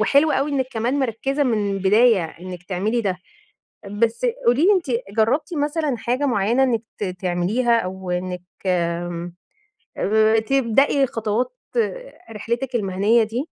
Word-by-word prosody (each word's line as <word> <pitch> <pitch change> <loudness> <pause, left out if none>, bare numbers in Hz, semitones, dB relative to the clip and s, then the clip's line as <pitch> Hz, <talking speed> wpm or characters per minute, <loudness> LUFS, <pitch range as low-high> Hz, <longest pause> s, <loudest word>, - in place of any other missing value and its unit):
وحلو 280 +8 +4
أوي 280 +2 0
إنِّك 260 -2 0
كمان 240 +5 -1
مِركّزة 270 +3 -1
من 215 -6 0
البداية، 205 0 +4
إنِّك 180 +2 -9
تعملي 205 +6 -1
ده. 190 -4 -2 0.7
بس 225 - 0 0.2
قولي 265 +9 +4
لي، 415 - +6
أنتِ 365 -5 +1 0.3
جرّبتِ 285 +9 +1
مثلًا 295 -2 -1
حاجة 255 +4 -1
معيّنة 235 +2 +2
إنِّك 235 -4 +1 0.2
ت 210 - -2
تعمليها، 185 +6 0
أو 185 0 -6
إنِّك 180 0 -3 0.2
آمم 175 -1 -2 0.6
آآ 220 +1 +3
تبدأي 270 +3 +2
خطوات 225 +1 -1 0.8
رحلِتِك 235 +4 -3
المِهَنية 210 +2 +2
دي؟ 235 +7 -3
225 Hz, 130 wpm, -22 LUFS, 190-260 Hz, 0.8 s, لي